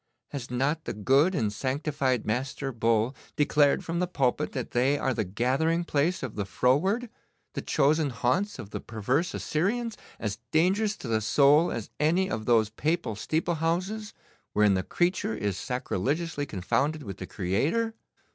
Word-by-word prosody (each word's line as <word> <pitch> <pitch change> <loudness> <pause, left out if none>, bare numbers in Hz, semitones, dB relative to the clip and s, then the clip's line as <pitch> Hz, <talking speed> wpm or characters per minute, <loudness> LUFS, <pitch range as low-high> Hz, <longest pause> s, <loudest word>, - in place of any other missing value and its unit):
Has 135 -4 -6
not 140 +6 0
the - - -3
good 135 - +3
and 105 -9 0
sanctified 130 0 -1
Master 135 +4 -2
Bull 115 +1 +1 0.2
declared 150 +3 +3
from 170 0 -2
the 180 - +1
pulpit 145 -3 0
that 130 -3 -4
they 130 +4 +2
are 135 -2 0
the 110 - 0
gathering 130 - +1
place 165 +1 0
of 130 - -4
the 100 - -1
froward, 145 - +1 0.5
the - - -3
chosen 150 +1 +2
haunts 135 - 0
of 110 -5 -9
the - - -4
perverse 125 - -1
Assyrians, 225 +8 -1 0.2
as 105 -1 -3
dangerous 195 +6 +2
to - - -8
the 110 -1 +1
soul 145 +8 +4
as 115 - -5
any 175 +6 +2
of 110 - -3
those 110 -3 +3
Papal 150 -2 -1
steeple 160 - -1
houses 190 +6 -1 0.4
wherein 105 -1 +4
the 95 - +1
creature 175 - 0
is 105 -3 -2
sacrilegiously 145 - -2
confounded 140 - -1
with 100 -5 -7
the 90 - -7
Creator? 150 - 0
140 Hz, 160 wpm, -28 LUFS, 115-165 Hz, 0.5 s, soul